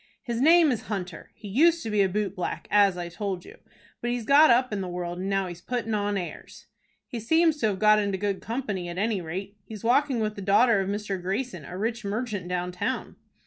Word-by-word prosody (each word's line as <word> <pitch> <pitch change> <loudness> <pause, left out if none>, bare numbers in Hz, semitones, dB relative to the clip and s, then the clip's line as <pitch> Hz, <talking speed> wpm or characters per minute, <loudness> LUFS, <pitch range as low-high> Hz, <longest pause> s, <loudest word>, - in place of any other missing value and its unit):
"His 235 -1 -3
name 325 +1 +6
is 240 - -3
Hunter. 185 -5 -5
He 210 - -10
used 325 - +3
to 225 - -4
be 210 -1 +3
a 195 - +3
boot 200 0 -2
black, 180 - -4
as 200 -3 +4
I 175 -1 -4
told 185 0 -4
you; - - -14 0.4
but 240 - -2
he's 240 -2 -2
got 290 +4 +7
up 250 -1 +3
in 200 - -2
the 185 - -4
world, 175 0 -4
and 190 +1 -3
now 195 -1 +1
he's 175 -1 -8
putting 230 0 -3
on 205 -1 0
airs." 180 -2 -8 0.4
"He 240 - -6
seems 320 +7 +3
to 225 - +1
have 200 -3 -1
got 215 +1 +5
into 200 -2 -1
good 200 0 -2
company, 210 -7 -3
at 175 - -6
any 210 -1 0
rate. 190 +5 -6
He 220 - -9
is 210 - -11
walking 255 +2 +2
with 215 -1 -1
the 200 - -7
daughter 205 +3 +4
of 195 0 -1
Mr. 200 -2 -3
Greyson, 190 - -3
a 180 - -7
rich 225 +3 -2
merchant 205 -2 -3
down 180 0 -2
town." 205 +8 -3
205 Hz, 235 wpm, -26 LUFS, 190-235 Hz, 0.4 s, got